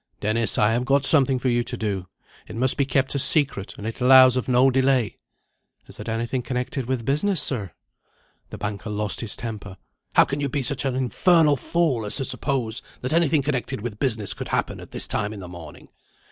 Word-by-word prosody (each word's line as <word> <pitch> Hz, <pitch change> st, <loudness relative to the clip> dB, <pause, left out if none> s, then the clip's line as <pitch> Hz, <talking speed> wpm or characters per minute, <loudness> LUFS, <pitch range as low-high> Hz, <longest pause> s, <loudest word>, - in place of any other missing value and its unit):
"Dennis, 110 Hz, +1 st, +1 dB
I 105 Hz, +1 st, +3 dB
have 120 Hz, +2 st, 0 dB
got 135 Hz, +2 st, +2 dB
something 135 Hz, -4 st, +4 dB
for 130 Hz, +1 st, -1 dB
you 120 Hz, 0 st, +1 dB
to -, -, -5 dB
do. 100 Hz, -4 st, -3 dB, 0.4 s
It -, -, -9 dB
must 125 Hz, +2 st, +2 dB
be 140 Hz, -, 0 dB
kept 135 Hz, 0 st, 0 dB
a 140 Hz, -, 0 dB
secret, 140 Hz, -9 st, +2 dB
and 105 Hz, -, -8 dB
it 115 Hz, +3 st, -6 dB
allows 130 Hz, 0 st, +7 dB
of 130 Hz, 0 st, -2 dB
no 130 Hz, +2 st, +4 dB
delay." 130 Hz, -5 st, +1 dB, 0.7 s
"Is -, -, -8 dB
it -, -, -6 dB
anything 115 Hz, +3 st, -2 dB
connected 125 Hz, 0 st, -4 dB
with 125 Hz, -3 st, -2 dB
business, 165 Hz, -, +1 dB
sir?" 105 Hz, -, -1 dB, 0.8 s
The -, -, -8 dB
banker 105 Hz, 0 st, -5 dB
lost 105 Hz, -1 st, -2 dB
his 115 Hz, -3 st, -4 dB
temper. 105 Hz, -4 st, -7 dB, 0.4 s
"How -, -, +7 dB
can 140 Hz, +1 st, -4 dB
you 140 Hz, -, -1 dB
be 140 Hz, 0 st, -2 dB
such 140 Hz, +2 st, 0 dB
an 130 Hz, -2 st, -1 dB
infernal 150 Hz, +4 st, +3 dB
fool 140 Hz, -4 st, 0 dB
as -, -, -6 dB
to 135 Hz, -, -2 dB
suppose 125 Hz, -6 st, -3 dB, 0.2 s
that 130 Hz, +4 st, -3 dB
anything 160 Hz, -3 st, +2 dB
connected 130 Hz, -6 st, -3 dB
with 110 Hz, -2 st, -6 dB
business 110 Hz, -7 st, -1 dB
could -, -, -7 dB
happen -, -, -2 dB
at -, -, -11 dB
this -, -, -2 dB
time 105 Hz, 0 st, -2 dB
in 105 Hz, -, -9 dB
the 90 Hz, -, -8 dB
morning? 85 Hz, -4 st, -11 dB
125 Hz, 210 wpm, -23 LUFS, 110-135 Hz, 0.8 s, allows